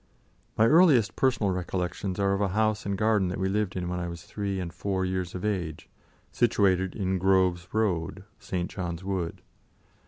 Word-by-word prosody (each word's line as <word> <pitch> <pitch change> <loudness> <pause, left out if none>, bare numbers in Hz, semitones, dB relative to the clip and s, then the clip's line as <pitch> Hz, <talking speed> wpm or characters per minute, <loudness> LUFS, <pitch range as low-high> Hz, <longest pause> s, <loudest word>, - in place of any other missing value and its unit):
My 110 - +5
earliest 150 - +5
personal 125 -7 +2
recollections 90 +1 -3
are 100 0 +2
of 100 - -1
a 100 - +2
house 110 -1 +1
and 100 -1 -1
garden 105 -2 +2
that 90 - -3
we 95 - +1
lived 100 0 -1
in 90 -1 -3
when 90 0 -2
I 85 - -3
was 85 -1 -7
three 100 -2 -3
and 85 -3 -5
four 95 -2 -1
years 90 -1 -3
of 90 - -4
age, 90 -7 -3 0.4
situated 95 -6 +2
in 95 -2 -1
Grove 95 -1 +2
Road, 95 -4 -1 0.2
St. 90 -1 -3
John's 85 -2 -5
Wood. 95 -3 -3
95 Hz, 180 wpm, -27 LUFS, 90-105 Hz, 0.4 s, My